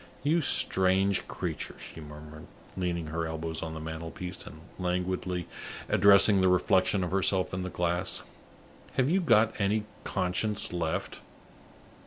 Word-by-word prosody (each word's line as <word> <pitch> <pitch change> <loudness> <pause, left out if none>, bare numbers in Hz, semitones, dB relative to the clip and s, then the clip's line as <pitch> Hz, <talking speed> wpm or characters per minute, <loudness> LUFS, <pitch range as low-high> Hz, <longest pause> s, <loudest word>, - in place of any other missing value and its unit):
"You 160 +4 +3
strange 95 -6 +2
creature!" - - -4
she 80 - -10
murmured, 75 +1 -11 0.3
leaning 85 -3 -2
her 80 +1 -3
elbows 80 0 -4
on 80 0 -5
the - - -5
mantelpiece, 80 +3 -6
and 80 - -11 0.2
languidly 90 0 -2 0.4
addressing 100 0 +6
the 95 - +4
reflection 95 +1 +3
of 90 - -3
herself 95 -1 +1
in 95 - -2
the 90 - -3
glass. 85 0 0 0.7
"Have 130 +3 +2
you 190 +2 +3
got 110 -8 +4
any 105 +2 +1 0.2
conscience 95 +2 0
left? 80 -2 -2
90 Hz, 135 wpm, -29 LUFS, 80-100 Hz, 0.7 s, addressing